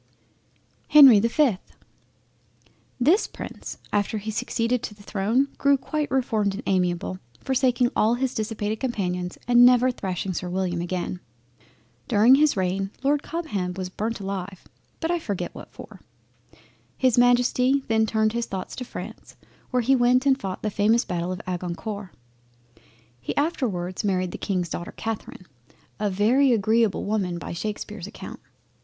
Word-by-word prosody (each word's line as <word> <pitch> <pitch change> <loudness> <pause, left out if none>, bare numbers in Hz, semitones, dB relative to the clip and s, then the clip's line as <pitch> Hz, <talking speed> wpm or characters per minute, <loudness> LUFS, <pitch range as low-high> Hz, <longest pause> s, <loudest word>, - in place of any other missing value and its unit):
HENRY 275 -8 +9
the 225 - +2
5th 235 -7 0 1.2
This 320 - +3
Prince - - -8 0.2
after 205 +1 0
he 215 +1 -4
succeeded 230 +2 -1
to 210 - -6
the 205 - -17
throne 220 +8 0
grew 280 0 +4
quite 300 +2 -3
reformed 220 -6 0
and 225 - -7
amiable, 180 -1 0 0.2
forsaking 255 -2 +1
all 225 +3 +3
his 260 +1 -1
dissipated 215 -1 -3
companions, 180 -8 -3
and 245 0 +6
never 250 +1 +6
thrashing 190 -4 -4
Sir 180 +1 -4
William 180 -1 -1
again. 180 0 -3 0.9
During 220 +5 +5
his 290 -3 +4
reign, 190 +1 -1
Lord 285 +1 +2
Cobham 210 - -3
was 185 -1 -4
burnt 220 +4 -3
alive, 195 -1 -5 0.4
but 325 0 -1
I 345 - +1
forget 195 - -4
what - - -11
for. - - -12 1.0
His 255 -2 +3
Majesty 250 +2 +3
then 220 0 +2
turned 220 0 +1
his 235 0 -2
thoughts 190 -1 -5
to 255 - -4
France, 250 - -9 0.3
where 250 -1 +1
he 270 +4 +4
went 250 +1 +3
and 275 -1 +5
fought 195 -8 -6
the 215 - -1
famous 220 +4 +2
Battle 175 -1 -3
of 185 - -6
Agincourt. 185 +3 -5 1.1
He 125 - -5
afterwards 225 - -1
married 185 -3 0
the - - -7
King's 180 -4 -2
daughter 175 - -6
Catherine, 220 -4 -5 0.5
a 210 -1 0
very 235 +8 +3
agreable 220 0 +2
woman 195 -5 -1
by 170 - -6
Shakespear's 210 0 -5
account. - - -9
215 Hz, 150 wpm, -24 LUFS, 185-250 Hz, 1.2 s, HENRY